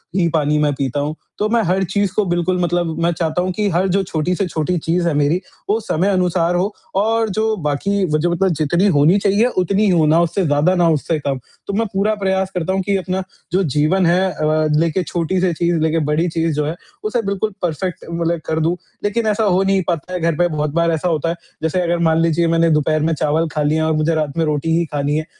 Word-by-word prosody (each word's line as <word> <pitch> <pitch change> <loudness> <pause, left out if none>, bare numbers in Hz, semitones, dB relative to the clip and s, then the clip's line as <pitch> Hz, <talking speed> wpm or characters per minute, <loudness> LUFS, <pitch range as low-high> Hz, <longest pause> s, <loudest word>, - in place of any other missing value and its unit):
ही 180 -3 +2
पानी 150 -1 +2
मैं 150 -1 +2
पीता 135 +1 -2
हूँ। 150 +2 -2 0.2
तो 210 - 0
मैं 230 0 +2
हर 190 +1 +1
चीज़ 195 +1 0
को 210 - +2
बिल्कुल 175 +1 0
मतलब 175 -1 0
मैं 170 - +3
चाहता 165 +1 -1
हूँ 185 +1 -1
कि 210 +2 -1
हर 185 +2 +1
जो 195 +2 +1
छोटी 175 0 -1
से 195 +1 -1
छोटी 165 +2 -1
चीज़ 170 +2 0
है 165 - +1
मेरी 145 +5 +1 0.3
वो 215 +2 +2
समय 190 -4 -1
अनुसार 180 -2 +1
हो 195 +4 0 0.3
और 225 +1 +1
जो 220 +2 0
बाकी 195 +8 0
व - - +4
जो 175 +2 +1
मतलब 190 +2 +1
जितनी 175 +6 +2
होनी 155 +7 +5
चाहिए 200 +3 +2
उतनी 195 +3 +2
हो 170 -4 +3
ना 160 +2 +4
उससे 170 +3 0
ज़्यादा 150 +5 +2
ना 175 -2 +3
उससे 160 +1 0
कम। 140 -2 -2 0.3
तो 200 - -3
मैं 225 - +1
पूरा 205 +3 +1
प्रयास 190 -1 -1
करता 180 +1 -1
हूँ 190 - 0
कि 200 +1 0
अपना 185 0 -3 0.3
जो 185 +3 +2
जीवन 155 +5 +1
है 175 +2 +3
अ, 155 0 0
लेके 170 +3 +1
छोटी-सी 175 +2 -1
चीज़ 170 +1 0
लेके 160 +1 +1
बड़ी 165 +4 +1
चीज़ 165 0 -1
जो 150 - 0
है 155 +3 -3 0.3
उसे 220 +3 0
बिल्कुल 200 +2 -2
परफ़ेक्ट 180 +2 -3
मतलब 170 0 -1
कर 160 - -1
दूँ। 165 +2 +1 0.3
लेकिन 220 +2 0
ऐसा 215 +1 +1
हो 190 -1 +2
नहीं 195 0 +2
पाता 175 +1 -3
है 180 - -2
घर 165 -1 0
पे 175 - +3
बहुत 150 -2 -2
बार 170 0 +2
ऐसा 160 +2 -1
होता 165 -1 0
है 170 - -1 0.3
जैसे 160 +3 0
अगर 175 0 0
मान 160 - +2
लीजिये 165 0 +2
मैंने 165 0 +3
दोपहर 155 0 +1
में - - +1
चावल 155 +2 0
खा 150 - -1
लिया 160 +2 +1
और 160 - +1
मुझे 155 +2 +1
रात 155 -1 -2
में 165 - +2
रोटी 155 +2 0
ही 170 - +1
खानी 145 0 -1
है, 155 - -2
170 Hz, 240 wpm, -18 LUFS, 155-190 Hz, 0.3 s, होनी